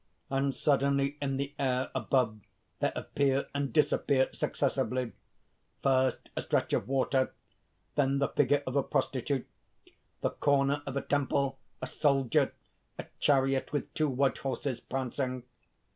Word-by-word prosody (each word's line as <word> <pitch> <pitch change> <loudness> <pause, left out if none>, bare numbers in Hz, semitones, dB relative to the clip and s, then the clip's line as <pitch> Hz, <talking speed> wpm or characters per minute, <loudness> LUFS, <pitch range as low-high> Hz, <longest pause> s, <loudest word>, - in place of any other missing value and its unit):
_ - - -1
_And 135 +1 +2
suddenly 140 0 +2
in 135 -1 -1
the 140 +1 -3
air 130 -1 0
above 115 -5 +1 0.4
there - - +1
appear 140 -1 +1
and 140 -1 -1
disappear 140 -3 +3
successively 125 -2 -1 0.7
first, 130 -1 +2
a - - -1
stretch - - 0
of 100 - +1
water; 135 0 +1 0.6
then 140 -1 +2
the 140 - +1
figure 145 +1 +2
of 130 - -3
a 140 - +4
prostitute; 135 -1 -1 0.8
the - - +1
corner 140 0 +2
of 135 0 -3
a - - 0
temple, 140 -1 0 0.2
a - - +1
soldier; 135 -2 +2 0.5
a - - -5
chariot 135 -1 +2
with 145 - -3
two 155 -1 +1
white 135 +1 +1
horses, 130 -1 -2
prancing. 130 0 -3
135 Hz, 140 wpm, -30 LUFS, 130-140 Hz, 0.8 s, a